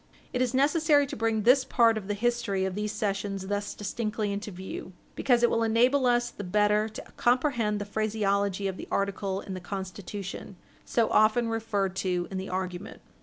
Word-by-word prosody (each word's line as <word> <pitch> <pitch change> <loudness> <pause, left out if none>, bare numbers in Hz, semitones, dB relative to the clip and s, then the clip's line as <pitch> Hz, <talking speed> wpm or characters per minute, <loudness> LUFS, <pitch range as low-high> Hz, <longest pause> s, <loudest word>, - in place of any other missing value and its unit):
It 250 - 0
is 255 0 +1
necessary 290 +1 +4
to - - -6
bring 225 -1 0
this 255 +4 +6
part 230 -3 +4
of 210 -3 -5
the 205 - -1
history 225 -4 0
of 190 - -2
these 210 +2 -2
cessions 200 -2 -2
thus 205 +1 -3
distinctly 210 0 -2
into 205 +1 -4
view 185 0 -7 0.2
because 245 -3 +2
it 240 - +6
will 230 - +1
enable 245 +4 +3
us 240 0 +2
the 205 - -7
better 210 +3 +2
to 215 - -8
comprehend 240 -4 +2
the 205 - -4
phraseology 200 -2 0
of 190 -1 -4
the - - -8
article 195 0 -1
in 195 - -7
the 185 - -5
Constitution 195 +1 -6 0.3
so 230 -2 +2
often 220 +2 +4
referred 205 -4 -1
to 180 -2 -1
in 190 - -3
the 190 - -6
argument. 185 +1 -4
210 Hz, 185 wpm, -28 LUFS, 195-235 Hz, 0.3 s, this